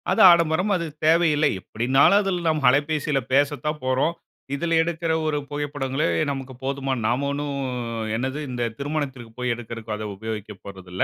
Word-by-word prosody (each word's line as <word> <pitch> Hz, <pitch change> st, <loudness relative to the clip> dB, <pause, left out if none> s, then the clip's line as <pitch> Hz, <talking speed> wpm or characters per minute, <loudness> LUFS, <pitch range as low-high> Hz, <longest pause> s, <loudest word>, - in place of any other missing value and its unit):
அது 225 Hz, -, +3 dB
ஆடம்பரம் 170 Hz, +3 st, +2 dB
அது 170 Hz, -2 st, -1 dB, 0.2 s
தேவையில்லை. 160 Hz, -2 st, +4 dB
எப்படின்னாலும் 135 Hz, -, +3 dB
அதுல 190 Hz, -3 st, -1 dB
நாம் 155 Hz, -3 st, +1 dB
அலைபேசியில 145 Hz, +1 st, +1 dB
பேசத்தான் 145 Hz, +2 st, +1 dB
போறோம். 130 Hz, +6 st, +1 dB, 0.4 s
இதுல 165 Hz, +2 st, +1 dB
எடுக்குற 165 Hz, 0 st, -2 dB
ஒரு 155 Hz, -1 st, 0 dB
புகைப்படங்களே 145 Hz, -1 st, -2 dB, 0.2 s
நமக்கு 135 Hz, -1 st, -5 dB
போதுமா 135 Hz, 0 st, -1 dB
நாம 125 Hz, +5 st, +1 dB
ஒண்ணும், 140 Hz, -1 st, -3 dB, 0.6 s
என்னது 130 Hz, +5 st, -2 dB
இந்த 120 Hz, -1 st, -2 dB
திருமணத்துக்கு 140 Hz, -5 st, -4 dB
போய் 125 Hz, 0 st, 0 dB
எடுக்கறதுக்கு 115 Hz, -2 st, -6 dB
அத 105 Hz, 0 st, -5 dB
உபயோகிக்கப்போறதில்ல. 100 Hz, -3 st, -5 dB
140 Hz, 135 wpm, -24 LUFS, 125-155 Hz, 0.6 s, தேவையில்லை